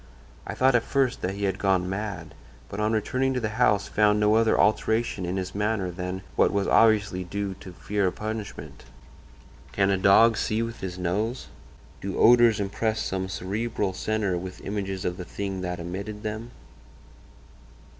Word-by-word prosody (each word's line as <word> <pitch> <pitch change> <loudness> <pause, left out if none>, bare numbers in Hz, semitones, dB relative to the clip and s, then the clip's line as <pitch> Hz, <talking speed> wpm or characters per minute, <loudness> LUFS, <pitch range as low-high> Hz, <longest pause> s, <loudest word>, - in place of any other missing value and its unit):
I - - -4
thought 130 +1 +4
at 120 - +4
first 130 +1 0
that 95 +2 -2
he 100 - -5
had 95 -1 -1
gone 95 -2 +1
mad, 100 +2 -5 0.4
but 100 - -6
on 105 0 +1
returning 130 +4 0
to - - +1
the 110 -3 -2
house 105 -4 +3
found 105 0 +3
no 105 0 +3
other 115 0 +3
alteration 110 -3 +1
in 90 +2 -2
his 95 0 -4
manner 105 -3 -1
than 90 +1 -5
what - - +3
was 100 -1 0
obviously 105 -4 +3
due 100 +2 -4
to 95 - -10
fear 100 +2 -1
of 90 - -2
punishment. 110 -1 -6 0.9
"Can 100 0 +2
a 95 - +1
dog 110 +4 +5
see 110 +2 0
with 115 0 -6
his 90 -1 -5
nose? 105 +8 -2 0.5
Do 100 0 -4
odors 120 -2 +6
impress 110 +2 -1
some 95 -2 -2
cerebral 100 +1 -2
centre 100 -2 -1
with 95 +1 -8
images 95 -2 -3
of 90 0 -2
the 90 - -5
thing 95 +1 -5
that 90 -1 -4
emitted 100 +5 -6
them? 110 +2 -4
100 Hz, 175 wpm, -26 LUFS, 95-110 Hz, 0.9 s, odors